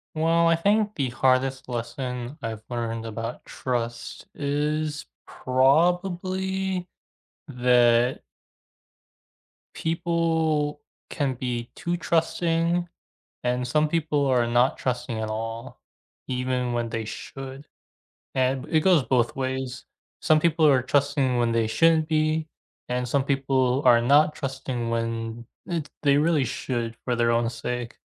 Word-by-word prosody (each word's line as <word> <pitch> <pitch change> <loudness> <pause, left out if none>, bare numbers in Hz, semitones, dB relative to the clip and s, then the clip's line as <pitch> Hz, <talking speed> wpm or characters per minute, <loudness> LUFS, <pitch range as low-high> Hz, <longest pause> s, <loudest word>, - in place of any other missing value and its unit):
Well, 165 +1 +3
I 165 - +5
think 205 +4 +2
the 135 -4 -1
hardest 130 +2 +1
lesson 125 +2 -4
I've 110 -1 -4
learned 115 -1 -3
about 115 +2 -5
trust 120 -2 -4
is 150 +1 -2 0.2
probably 180 +7 +1 0.6
that 125 -1 +3 1.5
people 160 -3 0 0.3
can 140 -3 -1
be 120 -1 -3
too 175 0 -2
trusting, 170 +1 +1 0.6
and 125 0 0
some 150 +4 +2
people 150 -3 0
are 125 -3 +3
not 120 +2 +2
trusting 125 -3 -3
at 110 - -3
all, 115 +1 -5 0.5
even 125 -1 -1
when 120 -1 -1
they 115 0 -3
should. 135 +5 -8 0.7
And 130 0 +1
b 160 - 0
it - - +6
goes 180 -3 +5
both 125 -2 +1
ways. 130 -1 -3 0.4
Some 155 -1 +4
people 160 -1 +3
are 135 -3 +5
trusting 140 -1 +1
when 120 -1 +2
they 115 -1 +2
shouldn't 160 +7 +3
be, 155 0 +1 0.4
and 125 0 -1
some 135 +2 +1
people 135 -2 +1
are 120 -1 +6
not 145 +5 +4
trusting 130 -4 -4
when 115 0 -3 0.2
it 165 -4 -3
they 140 -1 +4
really 150 -2 +2
should 115 -1 -3
for 125 - 0
their 115 0 +2
own 115 0 +1
sake. 120 0 -5
130 Hz, 125 wpm, -25 LUFS, 120-155 Hz, 1.5 s, it